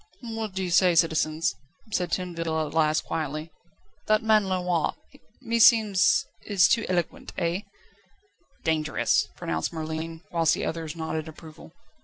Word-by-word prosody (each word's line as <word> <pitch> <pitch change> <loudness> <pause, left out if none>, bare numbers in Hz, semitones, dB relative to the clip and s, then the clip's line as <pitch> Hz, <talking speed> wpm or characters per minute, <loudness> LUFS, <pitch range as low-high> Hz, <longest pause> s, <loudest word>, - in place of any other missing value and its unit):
"What 225 -4 -5
say 190 - 0 0.3
you, 175 - +1
citizens?" 160 -1 +2 0.4
said 180 -4 -1
Tinville 165 -3 -2
at 150 - -8
last 155 -1 +2
quietly. 155 +1 -4 0.6
"That 215 0 +3
man 215 -3 +3
Lenoir, 180 -2 0 0.5
meseems, 220 -6 +4 0.2
is 195 -5 +4
too 230 -2 +1
eloquent 175 -3 -2
eh?" 170 +1 0 1.0
"Dangerous," 155 -2 +1
pronounced 80 0 -3
Merlin, 160 +1 -5
whilst 165 -2 +3
the - - -3
others 160 -1 -4
nodded 160 -1 -4
approval. 160 0 -12
165 Hz, 125 wpm, -26 LUFS, 160-190 Hz, 1.0 s, meseems